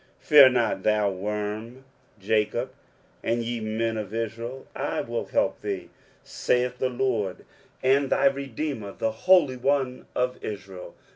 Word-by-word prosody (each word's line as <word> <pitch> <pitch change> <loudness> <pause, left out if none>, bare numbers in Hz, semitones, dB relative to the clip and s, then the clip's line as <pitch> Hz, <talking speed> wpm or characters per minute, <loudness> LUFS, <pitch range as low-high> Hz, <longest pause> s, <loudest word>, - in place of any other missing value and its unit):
23:041:014 - - -25
Fear 145 -3 +10
not, 120 -6 0
thou 105 0 +2
worm 105 +6 -4 0.3
Jacob, 110 +5 0 0.5
and 115 +1 0
ye 120 0 -3
men 110 +1 -1
of 105 -2 -5
Israel; 115 +3 -4
I - - -2
will - - -3
help - - 0
thee, - - -4 0.3
saith 125 0 0
the 130 - +1
LORD, 120 -7 -1 0.4
and 135 +1 +3
thy - - +2
redeemer, 135 -5 -1
the 110 - -1
Holy 145 +2 +4
One 130 -1 0
of 125 0 -1
Israel. 95 -3 -7
115 Hz, 140 wpm, -26 LUFS, 105-130 Hz, 0.5 s, Fear